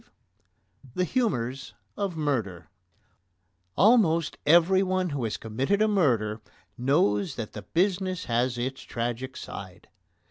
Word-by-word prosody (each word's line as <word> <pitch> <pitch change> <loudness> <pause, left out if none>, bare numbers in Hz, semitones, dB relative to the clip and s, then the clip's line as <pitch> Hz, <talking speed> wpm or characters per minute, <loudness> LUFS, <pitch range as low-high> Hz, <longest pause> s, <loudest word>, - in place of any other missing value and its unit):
V - - -31 0.9
THE 180 - +1
HUMOURS 135 - -2 0.2
OF 195 -5 -3
MURDER 100 - -2 1.1
Almost 180 -7 +4
everyone 185 +3 +4
who 140 -3 -3
has 110 -1 -2
committed 130 - -1
a 215 - +4
murder 120 - +1 0.3
knows 120 - +1
that 115 -3 -6
the - - -6
business 185 0 -1
has 120 +1 0
its 130 +2 -3
tragic 120 +2 -4
side. 95 +1 -9
135 Hz, 115 wpm, -27 LUFS, 115-185 Hz, 1.1 s, Almost